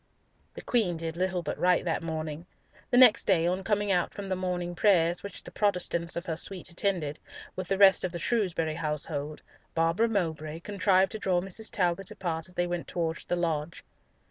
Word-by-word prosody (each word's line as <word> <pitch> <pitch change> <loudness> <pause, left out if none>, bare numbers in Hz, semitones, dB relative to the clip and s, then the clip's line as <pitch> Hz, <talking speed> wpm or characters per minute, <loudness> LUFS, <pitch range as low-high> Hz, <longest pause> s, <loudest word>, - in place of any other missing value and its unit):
The - - -8
Queen 210 -9 +1
did 165 0 -4
little 185 0 -1
but - - -4
write 180 0 +3
that 165 - -1
morning. 160 0 -5 0.4
The 245 - +2
next 250 -4 +7
day, 170 -4 +3
on 180 +2 0
coming 205 0 0
out 180 -2 0
from 200 -2 -6
morning 180 -1 -3
prayers, 175 -2 +3
which 200 -2 -8
the - - -10
Protestants 180 -4 0
of 170 - -4
her 165 -3 -2
suite 180 +2 0
attended, 170 -5 -1 0.4
with 185 -1 -4
the 195 - 0
rest 195 -1 +7
of 185 - -1
the 175 - -5
Shrewsbury 170 -5 0
household, 150 -1 -3 0.3
Barbara 165 +8 +2
Mowbray 160 -6 -2
contrived 195 -1 +2
to 220 - -5
draw 185 -4 +1
Mrs. 195 +4 -3
Talbot 180 0 0
apart 175 -6 -4
as 180 - -14
they 175 - +1
went 175 -1 -4
towards 165 -2 -3
the 175 - -1
lodge. 165 -2 -2
175 Hz, 190 wpm, -28 LUFS, 165-195 Hz, 0.4 s, next